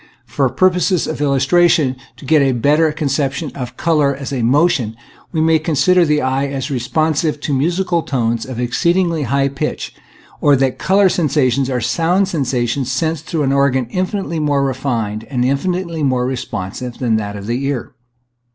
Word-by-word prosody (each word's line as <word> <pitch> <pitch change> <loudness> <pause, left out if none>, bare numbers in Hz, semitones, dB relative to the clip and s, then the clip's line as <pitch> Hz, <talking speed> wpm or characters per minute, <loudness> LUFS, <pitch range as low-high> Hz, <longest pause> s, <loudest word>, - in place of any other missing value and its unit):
For - - 0
purposes 185 -1 +2
of 155 -2 -4
illustration 145 +2 +3
and - - -9 0.2
to - - -12
get 155 +2 +4
a 135 -1 +2
better 150 +6 +2
conception 145 0 -2
of 125 -3 -7
color 150 -4 +2
as 140 0 -6
a 130 - -1
motion, 125 -3 +2 0.4
we 160 - 0
may 160 0 +3
consider 165 +3 +3
the 150 -1 +1
eye 135 +2 0
as 140 +1 -4
responsive 155 +4 0
to 145 - -2
musical 170 +5 0
tones 115 -5 -1
of 130 -1 -6
exceedingly 170 +7 +1
high 140 +1 +2
pitch; 140 +2 -4 0.5
or, 145 -1 +5
that 135 -1 0
color 195 +1 +3
sensations 140 -6 +1
are 125 -2 -1
sound 175 - +1
sensations 130 -4 -1
sensed 160 +3 -2
through 160 -3 -1
an 135 0 +1
organ 140 -2 +2
infinitely 185 -2 -2
more 145 -2 +1
refined 115 -5 -2
and 125 0 -1
infinitely 170 +4 -1
more 130 -3 +1
responsive 120 -2 -5
than 115 -4 +1
that 105 -1 -4
of 100 -1 -7
the 120 +5 -2
ear. 135 -4 -3
140 Hz, 170 wpm, -17 LUFS, 130-160 Hz, 0.5 s, or